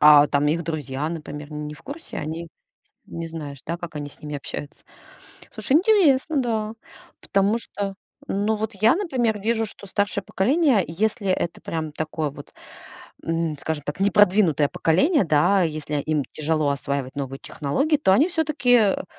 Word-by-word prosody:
а 150 Hz, -1 st, +8 dB
там 145 Hz, +1 st, +2 dB
их 165 Hz, +3 st, +1 dB
друзья, 150 Hz, -3 st, -3 dB
например, 150 Hz, -2 st, -7 dB
не 150 Hz, 0 st, -5 dB
в 140 Hz, -, -17 dB
курсе? 320 Hz, +4 st, -8 dB
Они. 165 Hz, +2 st, -5 dB, 0.6 s
Не 165 Hz, 0 st, -5 dB
знаешь, 150 Hz, -4 st, -7 dB
да, 170 Hz, +2 st, -3 dB
как 175 Hz, -3 st, -8 dB
они 145 Hz, -1 st, -4 dB
с -, -, -14 dB
ними 150 Hz, -1 st, -5 dB
общаются? 145 Hz, +1 st, -7 dB, 0.7 s
Слушай, 270 Hz, -, -1 dB
интересно, 320 Hz, -8 st, +4 dB
да. 220 Hz, -2 st, -1 dB, 0.5 s
Потому 200 Hz, +3 st, +2 dB
что, 200 Hz, -4 st, -5 dB, 0.3 s
ну, 210 Hz, +2 st, 0 dB
вот 220 Hz, +1 st, -3 dB
я, 220 Hz, +7 st, +4 dB
например, 255 Hz, -, 0 dB
вижу, 225 Hz, +2 st, 0 dB
что 200 Hz, 0 st, -11 dB
старшее 200 Hz, 0 st, -1 dB
поколение, 260 Hz, -, +3 dB
если 205 Hz, +5 st, -1 dB
это 175 Hz, -2 st, -1 dB
прям 155 Hz, -2 st, -4 dB
такое 155 Hz, -1 st, -3 dB
вот, 145 Hz, 0 st, -12 dB, 0.7 s
м, 165 Hz, -2 st, -1 dB
скажем 150 Hz, -1 st, -3 dB
так, 145 Hz, +5 st, -4 dB
непродвинутое 190 Hz, -7 st, +4 dB
поколение, 225 Hz, -, +2 dB
да. 165 Hz, +5 st, +3 dB
Если 155 Hz, -2 st, -2 dB
им 150 Hz, -2 st, 0 dB
тяжело 155 Hz, -1 st, 0 dB
осваивать 140 Hz, -1 st, -3 dB
новую 135 Hz, -1 st, -4 dB
технологии, 275 Hz, -, 0 dB
то 235 Hz, -10 st, +3 dB
они 295 Hz, -, +5 dB
всё-таки, 305 Hz, -7 st, 0 dB
э, 205 Hz, -5 st, +2 dB
170 Hz, 160 wpm, -23 LUFS, 150-220 Hz, 0.7 s, а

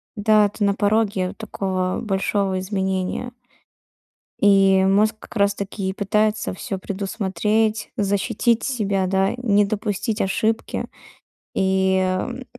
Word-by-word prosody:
Да, 210 Hz, 0 st, +4 dB
ты 205 Hz, +1 st, -4 dB
на 200 Hz, 0 st, +3 dB
пороге 205 Hz, -3 st, +1 dB
такого 190 Hz, -4 st, -2 dB
большого 195 Hz, -2 st, 0 dB
изменения. 190 Hz, +4 st, -2 dB, 1.1 s
И 195 Hz, -1 st, +5 dB
мозг 205 Hz, +3 st, +3 dB
как -, -, -14 dB
раз-таки 200 Hz, -1 st, -1 dB
и 190 Hz, -, -3 dB
пытается 210 Hz, +1 st, 0 dB
всё 195 Hz, +1 st, -5 dB
предусмотреть, 205 Hz, +3 st, -1 dB
защитить 210 Hz, +3 st, +1 dB
себя, 200 Hz, -7 st, 0 dB
да, 190 Hz, +1 st, +1 dB
не 210 Hz, -4 st, +3 dB
допустить 210 Hz, +2 st, -2 dB
ошибки. 220 Hz, +3 st, -1 dB, 0.7 s
И, 190 Hz, 0 st, +2 dB
м, 185 Hz, +7 st, -2 dB
200 Hz, 110 wpm, -22 LUFS, 190-215 Hz, 1.1 s, И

